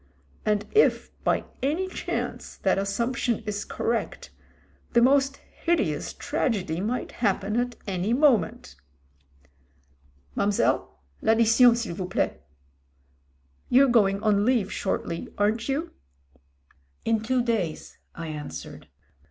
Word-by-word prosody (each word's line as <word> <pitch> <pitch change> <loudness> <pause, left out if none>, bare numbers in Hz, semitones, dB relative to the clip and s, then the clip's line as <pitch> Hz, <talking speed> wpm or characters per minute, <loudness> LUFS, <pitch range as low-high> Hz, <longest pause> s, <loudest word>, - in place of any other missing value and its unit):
And 210 -1 +1
if, 435 - +3
by - - +1 0.2
any 315 +8 0
chance, 375 - -4
that - - +1
assump 235 +6 -1
tion 235 -2 0
is 205 -1 -3
correct, 230 0 -3 0.6
the 235 - +5
most 275 +1 +3
hideous 205 - -1
tragedy 205 - -1
might 235 +5 -2
happen 200 -1 +1
at 245 0 0
any 195 +1 -1
moment. 240 - +2 1.6
Mam'selle, 200 0 +1 0.3
I'addition 230 +2 +5
s'il 230 -7 -3
vous 180 +1 -4
plait. 65 - -1 1.3
You're 265 +2 +6
going 200 -4 +3
on 205 -2 +3
leave 225 -4 +2
shortly, 170 -3 -3
aren't 220 +4 +1
you?" 305 +5 -1 1.1
In 225 -1 +2
two 250 +2 +1
days," 210 -10 -2 0.2
I 165 -1 -6
answered. 145 - -7
225 Hz, 110 wpm, -26 LUFS, 195-250 Hz, 1.6 s, You're